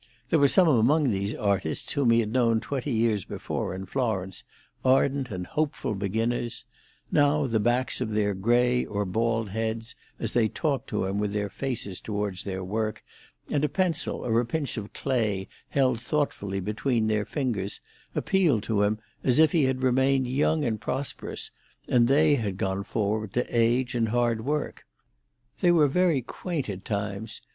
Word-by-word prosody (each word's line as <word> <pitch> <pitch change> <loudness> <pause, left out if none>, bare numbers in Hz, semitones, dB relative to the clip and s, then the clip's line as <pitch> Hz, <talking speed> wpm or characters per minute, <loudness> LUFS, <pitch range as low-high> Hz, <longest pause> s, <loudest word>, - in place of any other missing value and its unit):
There 160 - +4
were 140 - +6
some 180 +5 +5
among 140 +1 +4
these 100 +2 -1
artists 100 -7 -1
whom 140 -5 +2
he 115 0 +5
had 110 0 -4
known 115 -3 +3
twenty 140 +3 -3
years 110 -4 +1
before - - -4
in 95 +1 -6
Florence, 95 -7 -2 0.4
ardent 135 0 +2
and 90 -4 -4
hopeful 150 - -2
beginners; 115 +4 -2 0.4
and - - -16
now 145 0 +3
the 115 -4 +1
backs 120 +4 0
of 120 - -1
their 105 -1 +1
grey 120 +5 +2
or 105 0 -2
bald 115 +2 0
heads, 110 +2 -3 0.3
as 115 - -1
they 120 -2 +3
talked 140 +2 -2
to - - -1
him 95 +2 -1
with 105 -1 -1
their 105 -1 -1
faces 115 -9 -3
towards 105 -3 -3
their 95 -1 -3
work, 110 +3 -2 0.4
and 145 -1 0
a 150 - +2
pencil 185 -5 -1
or 115 -1 +2
a 120 - +1
pinch 145 +2 -2
of 105 -3 -6
clay 110 -8 -1 0.2
held 130 -4 +1
thoughtfully 100 -11 -1
between 110 +4 0
their 110 -1 +1
fingers, 110 -8 -2 0.4
appealed 165 - +2
to 110 -3 0
him 105 +1 +2 0.3
as 125 0 +3
if 155 -1 +6
he 160 -5 +3
had 130 0 -1
remained 130 +1 +3
young 145 +4 +1
and 110 -3 -1
prosperous, 130 +5 -4 0.4
and 120 -2 +4
they 150 +3 +5
had 105 -8 -1
gone 95 +1 -1
forward 105 -1 -2
to 125 - +1
age 120 +2 +2
and 115 -2 +1
hard 120 -1 +1
work. 150 +3 -3 0.7
They 175 - +4
were 160 -4 +5
very 165 -2 +2
quaint 155 0 -4
at 95 -1 -8
times. 105 +1 -4
115 Hz, 175 wpm, -27 LUFS, 105-135 Hz, 0.7 s, were